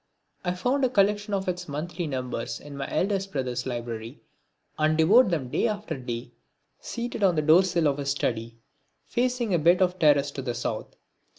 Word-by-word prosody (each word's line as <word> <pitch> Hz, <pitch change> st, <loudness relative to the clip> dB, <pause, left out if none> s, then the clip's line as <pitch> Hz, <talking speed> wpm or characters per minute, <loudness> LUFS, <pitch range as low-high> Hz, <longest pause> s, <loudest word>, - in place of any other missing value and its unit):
I 180 Hz, -1 st, -1 dB
found 255 Hz, +9 st, 0 dB
a 260 Hz, -, +4 dB
collection 205 Hz, -1 st, +2 dB
of 190 Hz, -1 st, -3 dB
its 180 Hz, 0 st, -3 dB
monthly 165 Hz, +4 st, -4 dB
numbers 125 Hz, -3 st, -4 dB
in 145 Hz, -1 st, -10 dB
my 140 Hz, -1 st, -4 dB
eldest 195 Hz, +3 st, 0 dB
brother's 125 Hz, -2 st, -2 dB
library 120 Hz, -2 st, -5 dB, 0.6 s
and 155 Hz, 0 st, +2 dB
devoured 205 Hz, +9 st, +6 dB
them 150 Hz, -8 st, -1 dB
day 235 Hz, -, +1 dB
after 210 Hz, -6 st, -3 dB
day, 120 Hz, -2 st, -6 dB, 0.5 s
seated 235 Hz, -1 st, -5 dB
on 190 Hz, -3 st, +4 dB
the 155 Hz, -, +1 dB
doorsill 170 Hz, +1 st, +4 dB
of 145 Hz, 0 st, 0 dB
his 140 Hz, -1 st, -2 dB
study, 115 Hz, -4 st, -2 dB, 0.5 s
facing 245 Hz, -3 st, 0 dB
a 170 Hz, -, +3 dB
bit 170 Hz, +4 st, +4 dB
of 185 Hz, 0 st, +1 dB
terrace 145 Hz, -3 st, +4 dB
to 140 Hz, -, -5 dB
the 125 Hz, -2 st, -3 dB
South. 120 Hz, -, -4 dB
160 Hz, 180 wpm, -26 LUFS, 135-195 Hz, 0.6 s, devoured